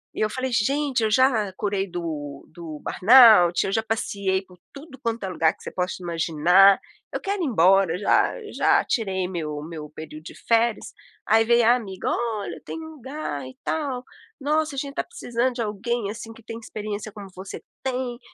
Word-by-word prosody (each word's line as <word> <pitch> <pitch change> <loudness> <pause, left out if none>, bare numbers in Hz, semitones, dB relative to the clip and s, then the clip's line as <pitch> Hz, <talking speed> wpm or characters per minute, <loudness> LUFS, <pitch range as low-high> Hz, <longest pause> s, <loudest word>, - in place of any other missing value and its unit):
E - - -6
eu 215 - +1
falei: 255 +3 -3
"Gente, 275 +3 +1
eu 220 - +2
já 225 -4 +3
curei 200 0 -2
do 150 -5 -5
do 160 -2 -8
burnout, 215 -5 +6
eu 195 - -2
já 220 - +2
passeei 200 -4 -1
por 180 -1 -19
tudo 280 -2 -12
quanto 230 -1 -2
é - - -3
lugar 165 -3 +2
que - - -18
você - - -6
possa 180 0 -2
imaginar, 175 +3 +4 0.4
eu - - -3
quero 400 -1 -2
ir - - +1
embora, 190 -5 +4
já 205 - +3 0.2
já - - +3
tirei 190 -5 -1
meu 155 -5 -4
meu 155 -1 -8
período 155 0 -9
de - - -10
férias!". 230 -1 +1 0.3
Aí 225 +1 +4
veio 235 0 +4
a 240 - +6
amiga: 195 -6 -5
"Olha 225 -4 -3
tem - - -6
um 320 0 -8
lugar 265 - -6
e 130 - -13
tal, 275 -6 -2 0.4
nossa 305 +1 0
a - - -2
gente 280 0 -5
tá - - -1
precisando 250 - -2
de 240 - -3
alguém 215 +1 -2
assim 225 +1 -8
que 225 - -17
tem 225 +1 -7
experiência 215 -1 -6
como 200 -1 -10
você 190 +1 -8 0.2
tem 255 -2 -3
215 Hz, 190 wpm, -24 LUFS, 180-245 Hz, 0.4 s, burnout